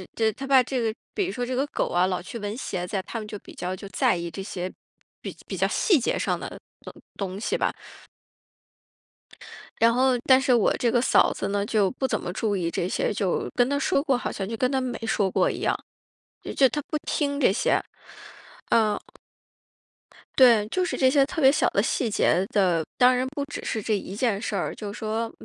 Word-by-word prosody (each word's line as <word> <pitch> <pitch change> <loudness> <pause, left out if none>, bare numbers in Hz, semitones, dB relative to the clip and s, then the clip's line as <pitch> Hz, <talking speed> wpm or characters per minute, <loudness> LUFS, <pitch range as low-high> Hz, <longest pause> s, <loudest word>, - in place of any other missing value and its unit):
这 220 -1 +2
她 270 +6 -7
怕 265 -2 +6
这 255 +1 -2
个 225 -1 0 0.2
比 400 - 0
如 375 - -3
说 245 -1 -2
这 255 - -4
个 275 +3 0
狗 - - -2
啊 180 +1 +2
老 180 -1 -2
去 205 +6 -8
闻 205 +1 -4
鞋 185 -8 -4
子 200 - -6
呀， 190 - -2
他 230 - -5
们 215 - -7
就 210 0 -6
比 - - -14
较 180 +1 -4
就 195 +1 -10
在 - - +2
意 170 -1 -5
这 195 - -6
些 185 -2 -5 0.5
比 - - -5
较 - - -26
比 - - -5
较 - - +2
细 365 - +3
节 - - -1
上 - - -1
的 - - -7 0.2
东 - - -10 0.2
东 190 -2 -4
西 - - -1
吧。 - - 0 2.1
然 230 0 +5
后 255 +1 +3
但 260 0 +6
是 255 -1 +3
我 230 - +3
这 240 - +1
个 240 - +2
嫂 250 - +4
子 - - -3
呢， 200 0 0
就 205 -3 +2
不 265 +1 -1
怎 - - -1
么 175 - -5
注 205 +1 -1
意 170 -2 -1
这 175 - -2
些， - - 0
就 195 -3 -1
跟 245 0 +3
她 285 +1 0
说 295 -2 +1
过 275 -4 +2
好 245 - -3
像 195 -1 -4
就 225 - -4
跟 255 +2 +1
她 265 - +1
没 255 -1 -3
说 200 -3 +1
过 - - +2
一 - - -5
样， - - 0 0.6
也 - - -6
就 270 - +5
她 295 - -3
不 305 - -1
听 285 -1 -1
这 245 - +4
些。 200 - +1 0.9
嗯。 215 -2 +3 1.4
对， 235 -5 +6
就 370 +11 -1
是 360 - -1
这 260 -1 +4
些 275 0 +4
特 320 +1 -4
别 265 0 +7
小 - - +2
的 - - +1
细 250 - 0
节 190 -3 +2
的， 180 -5 +2
当 255 0 +5
然 250 +1 0
不 285 - -2
只 290 +1 -7
是 220 - -2
这 215 - 0
一 195 -1 -4
件 220 -3 0
事 210 -2 -3
儿， 185 - -2
就 210 -2 -6
是 205 - -9
说 225 +1 -2
225 Hz, 250 characters per minute, -25 LUFS, 200-260 Hz, 2.1 s, 别